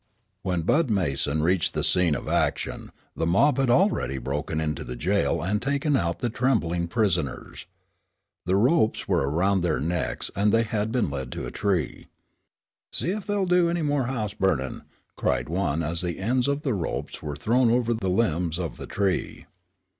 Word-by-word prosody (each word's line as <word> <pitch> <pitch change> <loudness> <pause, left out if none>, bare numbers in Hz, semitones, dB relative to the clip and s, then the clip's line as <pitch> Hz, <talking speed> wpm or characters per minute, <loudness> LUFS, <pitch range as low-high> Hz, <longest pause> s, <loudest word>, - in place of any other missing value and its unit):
When 90 -3 -1
Bud 150 - +2
Mason 75 -6 0
reached 90 +1 +1
the - - 0
scene 90 -5 +3
of - - -6
action, - - -1 0.2
the 80 - -1
mob 130 - +3
had 135 -2 +2
already 150 - +2
broken 75 +5 -3
into 75 -2 -2
the 60 - -6
jail 85 +3 0
and 105 +4 0
taken 140 +2 +1
out 85 -8 0
the 120 - -2
trembling 95 -10 0
prisoners. 85 - -1 0.8
The 95 - +2
ropes 120 +3 +2
were 70 - +1
round 95 +5 +2
their 85 -3 0
necks 85 +3 -2
and 100 +2 +2
they 115 +1 +4
had 110 -1 -2
been 115 - 0
led 65 -3 -5
to - - -5
a - - -6
tree. 95 -7 -1 0.8
"See 175 - +1
ef 205 0 -4
they'll 205 -2 +1
do 180 -1 +3
anymore 145 -6 0
house 110 -6 -2
burnin'!" 75 - -1 0.4
cried - - 0
one 85 -3 0
as 80 +2 -1
the 90 -2 -3
ends 125 +6 +1
of 140 +1 -1
the 135 -6 0
ropes 90 -5 -4
were 75 -1 -4
thrown 115 - +2
over 120 0 +2
the 100 -5 -2
limbs 90 -4 +1
of 85 -5 -4
the - - -8
tree. 95 -2 -1
95 Hz, 175 wpm, -25 LUFS, 80-125 Hz, 0.8 s, they